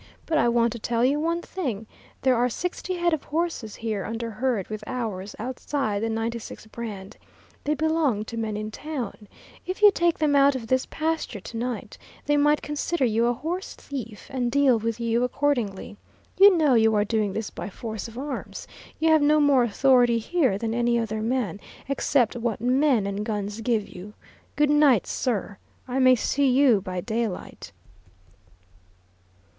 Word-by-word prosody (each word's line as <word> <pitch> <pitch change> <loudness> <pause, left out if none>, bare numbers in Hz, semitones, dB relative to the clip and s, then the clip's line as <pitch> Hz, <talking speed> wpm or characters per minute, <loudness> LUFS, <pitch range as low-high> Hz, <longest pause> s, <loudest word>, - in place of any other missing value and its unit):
But 315 -2 +1
I 240 - +3
want 235 0 +2
to 235 - -7
tell 235 +2 0
you 280 +3 +2
one 335 +2 -1
thing 245 - -4 0.4
there 260 -1 +4
are 245 +1 +2
sixty 360 +6 -3
head 345 -1 +1
of 310 - -1
horses 315 -9 -2
here 220 -4 -3
under 230 +1 -4
herd 225 -3 -1
with 215 -1 -6
ours, 215 -6 -4
outside 245 -2 -2
the 225 - -1
'96' 225 0 -4
brand. 210 -3 -7 0.5
They 300 +1 +1
belong 300 -8 +1
to 230 - -7
men 220 -2 -2
in 215 0 -5
town. 245 -6 -6 0.4
If 370 +3 -4
you 415 - +9
take 345 -3 +1
them 300 -2 +2
out 280 0 +5
of 245 -3 -4
this 260 +3 0
pasture 320 -8 -2
to 230 - -10
night, 240 0 -4 0.3
they 290 - +2
might 295 +1 +3
consider 295 0 -1
you 230 0 +2
a 240 - +2
horse 345 - -5
thief 235 -7 -8
and 250 -2 -1
deal 275 -4 +4
with 230 +1 -3
you 235 +1 +1
accordingly. 245 -7 -1 0.4
You 395 -2 +8
know 300 -5 +4
you 220 -2 +4
are 205 0 +2
doing 215 -2 0
this 220 +1 -4
by - - -6
force 220 +1 -6
of 230 +1 -12
arms. 275 +1 -6 0.3
You 320 +1 +2
have 315 -1 +5
no 300 +1 +4
more 285 -3 +4
authority 245 +1 +4
here 260 - +1
than 225 +1 -2
any 240 0 +1
other 220 -2 -2
man, 225 -5 -1 0.3
except 270 -3 +1
what 235 -2 -2
men 250 -1 +2
and 200 +1 -3
guns 210 0 -3
give 225 -2 0
you. 195 +4 -11 0.4
Good 295 -1 +3
night, 290 -8 +4
sir, 210 -5 -2 0.3
I 255 +1 -1
may 255 -1 +6
see 275 +3 +1
you 250 -5 +4
by 185 -2 -4
daylight." 220 -2 -4
240 Hz, 175 wpm, -25 LUFS, 220-285 Hz, 0.5 s, you